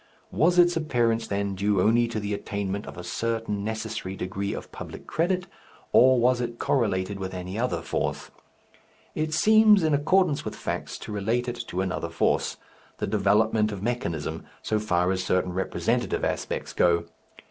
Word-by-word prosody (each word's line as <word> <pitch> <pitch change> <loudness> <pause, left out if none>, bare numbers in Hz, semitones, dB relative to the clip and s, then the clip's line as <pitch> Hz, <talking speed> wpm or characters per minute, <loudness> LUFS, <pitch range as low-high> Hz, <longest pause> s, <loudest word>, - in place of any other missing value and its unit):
Was 175 +3 +3
its 175 0 +6
appearance 120 -7 +1
then 100 0 -1
due 100 +1 +1
only 115 +5 +4
to 115 -2 -3
the 105 0 -3
attainment 100 0 -3
of - - -9
a 90 - -6
certain 110 +1 -2
necessary 110 -3 -4
degree 100 +2 -3
of - - -7
public - - -9
credit, 175 +3 0 0.5
or 130 0 +6
was 125 +1 +3
it 120 -1 -4
correlated 100 -7 0
with 95 -1 -5
any 90 +3 -5
other 85 -9 -1
force? - - -3 0.8
It 155 0 -2
seems 215 +3 +6
in 155 -1 +2
accordance 155 +1 +2
with - - -5
facts - - -4
to - - -8
relate 110 +5 -1
it 120 0 -4
to 90 - -2
another 90 -3 -2
force, 85 - 0 0.4
the - - -2
development 105 +1 +2
of 100 -1 -6
mechanism, 85 -10 -2 0.2
so 110 - 0
far 90 -4 +1
as 95 -1 -1
certain 90 -1 0
representative 95 +1 -1
aspects - - -3
go. 85 -1 +3
105 Hz, 165 wpm, -26 LUFS, 95-125 Hz, 0.8 s, its